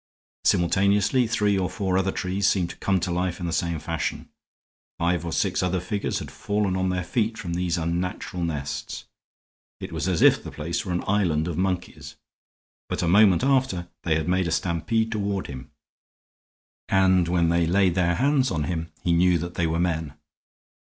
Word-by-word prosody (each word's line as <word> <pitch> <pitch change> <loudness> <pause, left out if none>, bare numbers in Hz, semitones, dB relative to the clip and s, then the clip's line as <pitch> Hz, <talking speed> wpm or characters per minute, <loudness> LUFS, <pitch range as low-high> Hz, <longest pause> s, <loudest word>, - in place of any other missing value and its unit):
Simultaneously 100 +7 +3
three 105 -3 +1
or 90 - -1
four 95 -3 -2
other 95 0 +1
trees 95 +2 -1
seemed 90 -3 +1
to - - -11
come 95 -1 +1
to 90 0 -2
life 90 0 -1
in 90 - -4
the 85 - -2
same 85 +1 -1
fashion. - - -4 0.7
Five 85 0 0
or 85 - -4
six 95 +3 0
other 90 0 0
figures 100 +3 -2
had - - -6
fallen 100 -2 -1
on 95 0 0
their 90 0 -1
feet 115 +4 -1
from 85 -3 -5
these 90 0 -1
unnatural 85 +1 -3
nests. 75 -4 -4 0.7
It - - -7
was - - -2
as - - +1
if - - +5
the - - -7
place 80 +3 -3
were 95 - -5
an 90 - -1
island 90 -6 +1
of 85 - -3
monkeys. 90 0 -3 0.7
But - - -2
a - - +1
moment 100 +3 +5
after 130 -11 +1
they 80 -2 +1
had 80 +1 -1
made 90 0 +1
a - - -2
stampede 90 +8 0
toward 100 -3 -2
him, 65 -1 -8 1.2
and 95 -2 +4
when 85 -1 +2
they 85 0 +2
laid 95 0 +3
their 90 -1 +1
hands 135 - +2
on 80 -6 -1
him 80 0 -3
he 85 - +2
knew 90 +1 +4
that 85 +2 -5
they 85 - 0
were 80 +1 -1
men. 80 -4 -1
90 Hz, 185 wpm, -25 LUFS, 85-95 Hz, 1.2 s, if